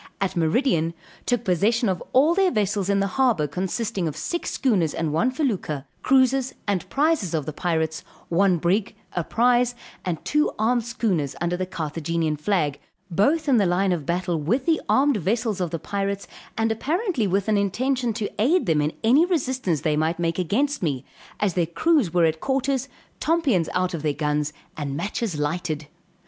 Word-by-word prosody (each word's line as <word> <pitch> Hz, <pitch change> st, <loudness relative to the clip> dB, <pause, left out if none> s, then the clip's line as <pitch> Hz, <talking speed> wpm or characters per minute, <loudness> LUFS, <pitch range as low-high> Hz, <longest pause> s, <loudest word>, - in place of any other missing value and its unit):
At 195 Hz, -1 st, -1 dB
meridian, 170 Hz, -, +1 dB, 0.3 s
took 245 Hz, -2 st, +1 dB
possession 220 Hz, +5 st, +2 dB
of 185 Hz, -2 st, -1 dB
all 290 Hz, +6 st, +5 dB
their 385 Hz, +1 st, +3 dB
vessels 205 Hz, -, 0 dB
in 200 Hz, 0 st, +2 dB
the -, -, +2 dB
harbor 225 Hz, -, +2 dB
consisting 185 Hz, -, -2 dB
of 150 Hz, -, -4 dB
six 345 Hz, -, -3 dB
schooners 195 Hz, -, +1 dB
and 160 Hz, -2 st, -1 dB
one 230 Hz, +11 st, +2 dB
felucca, 210 Hz, -, -2 dB, 0.2 s
cruisers, 265 Hz, 0 st, +3 dB
and 195 Hz, -4 st, -1 dB
prizes 280 Hz, -, +1 dB
of 155 Hz, -3 st, -1 dB
the 155 Hz, -, -4 dB
pirates, 160 Hz, -1 st, -1 dB, 0.2 s
one 185 Hz, +1 st, +3 dB
brig, 190 Hz, +6 st, 0 dB, 0.2 s
a 175 Hz, -, 0 dB
prize, 245 Hz, +4 st, +2 dB, 0.3 s
and 175 Hz, -3 st, -1 dB
two 300 Hz, +1 st, +2 dB
armed 230 Hz, +2 st, +1 dB
schooners 195 Hz, -, -1 dB
under 175 Hz, +1 st, 0 dB
the 185 Hz, +1 st, -3 dB
Carthagenian 160 Hz, -1 st, -2 dB
flag, 150 Hz, -3 st, 0 dB, 0.3 s
both 290 Hz, -, +2 dB
in 265 Hz, -4 st, +4 dB
the 200 Hz, -4 st, +3 dB
line 185 Hz, +2 st, +2 dB
of 160 Hz, -6 st, -2 dB
battle, 175 Hz, -2 st, -1 dB
with 235 Hz, -, 0 dB
the 325 Hz, -2 st, +2 dB
armed 275 Hz, -2 st, +4 dB
vessels 210 Hz, +2 st, -1 dB
of 175 Hz, -, 0 dB
the 165 Hz, -, -3 dB
pirates, 200 Hz, +3 st, -3 dB, 0.3 s
and 225 Hz, 0 st, +1 dB
apparently 305 Hz, -, 0 dB
with 195 Hz, +2 st, 0 dB
an 215 Hz, -, +3 dB
intention 245 Hz, +5 st, 0 dB
to 210 Hz, -1 st, -4 dB
aid 330 Hz, +11 st, +3 dB
them 160 Hz, -3 st, +2 dB
in 150 Hz, +1 st, 0 dB
any 255 Hz, +8 st, +5 dB
resistance 260 Hz, -, 0 dB
they 155 Hz, -1 st, +1 dB
might 160 Hz, +3 st, 0 dB
make 170 Hz, 0 st, -1 dB
against 270 Hz, -, 0 dB
me, 140 Hz, -7 st, -1 dB, 0.3 s
as 205 Hz, -3 st, +1 dB
their 170 Hz, -2 st, +1 dB
crews 275 Hz, -, +2 dB
were 175 Hz, -1 st, +4 dB
at 160 Hz, 0 st, 0 dB
quarters, 270 Hz, 0 st, 0 dB, 0.3 s
tompions 285 Hz, -, +1 dB
out 180 Hz, 0 st, 0 dB
of 165 Hz, -, -3 dB
their 150 Hz, -1 st, 0 dB
guns, 150 Hz, 0 st, -1 dB, 0.2 s
and 140 Hz, -2 st, -4 dB
matches 200 Hz, -1 st, -2 dB
lighted. 150 Hz, 0 st, -2 dB
195 Hz, 180 wpm, -24 LUFS, 165-250 Hz, 0.3 s, all